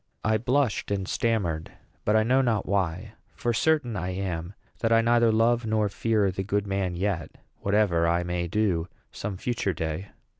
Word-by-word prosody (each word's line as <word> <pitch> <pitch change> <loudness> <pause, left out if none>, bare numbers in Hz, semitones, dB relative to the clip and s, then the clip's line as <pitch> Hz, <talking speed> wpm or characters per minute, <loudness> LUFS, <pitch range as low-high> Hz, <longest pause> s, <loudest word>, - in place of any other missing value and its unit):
I 110 0 +2
blushed 125 0 +1
and 100 -2 -1
stammered; 90 -9 -1 0.3
but 105 - +3
I 110 - +5
know 130 +4 +3
not 115 -5 +1
why; 100 +1 -1 0.2
for 120 - -1
certain 135 -2 +1
I 90 -2 -2
am 90 -1 -4 0.2
that 115 - 0
I 115 0 +6
neither 120 0 +4
love 115 +2 +3
nor 110 -1 +1
fear 105 -2 +1
the 95 - -3
good 100 +1 0
man 95 -2 -1
yet, 90 -3 -2 0.2
whatever 100 -5 +2
I 85 +1 +2
may 90 0 -2
do 90 -3 0 0.2
some 100 -2 -5
future 110 -2 -1
day. 80 +4 -3
100 Hz, 175 wpm, -26 LUFS, 90-115 Hz, 0.3 s, I